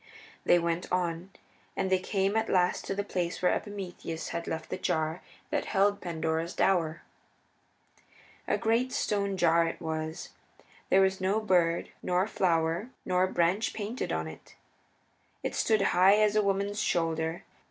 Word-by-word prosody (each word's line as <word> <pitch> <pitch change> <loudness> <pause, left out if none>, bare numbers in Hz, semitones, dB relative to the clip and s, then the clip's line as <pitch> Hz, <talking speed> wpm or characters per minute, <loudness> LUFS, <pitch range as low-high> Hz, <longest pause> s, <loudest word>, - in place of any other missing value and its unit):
They - - +6
went 170 0 -2
on, 175 0 -1 0.5
and 190 - -1
they 185 - +4
came 195 +2 0
at 225 0 +1
last 180 -1 +2
to 195 - -2
the 205 - -1
place 180 -3 -2
where 180 - +3
Epimetheus 185 -5 -5
had 170 0 -4
left 160 -1 -4
the - - -2
jar 160 -1 -1 0.3
that - - 0
held 200 +1 +2
Pandora's 165 0 -2
dower. 165 -4 +1 1.4
A - - +2
great 235 +3 +1
stone 200 -4 -1
jar 170 -1 +4
it - - -5
was; 160 -1 -4 0.6
there 190 - +5
was 190 0 +2
no 195 +3 +2
bird, 175 -5 +2
nor 180 +1 +1
flower, 170 +1 0 0.2
nor 185 0 +2
branch 185 +5 +1
painted 220 +3 -3
upon 80 0 -2
it. 80 - -12 0.9
It - - -2
stood 215 -3 +2
high 185 +3 +6
as 215 -1 +3
a 215 - +5
woman's 200 +1 0
shoulder. 165 0 -1
180 Hz, 150 wpm, -29 LUFS, 165-200 Hz, 1.4 s, They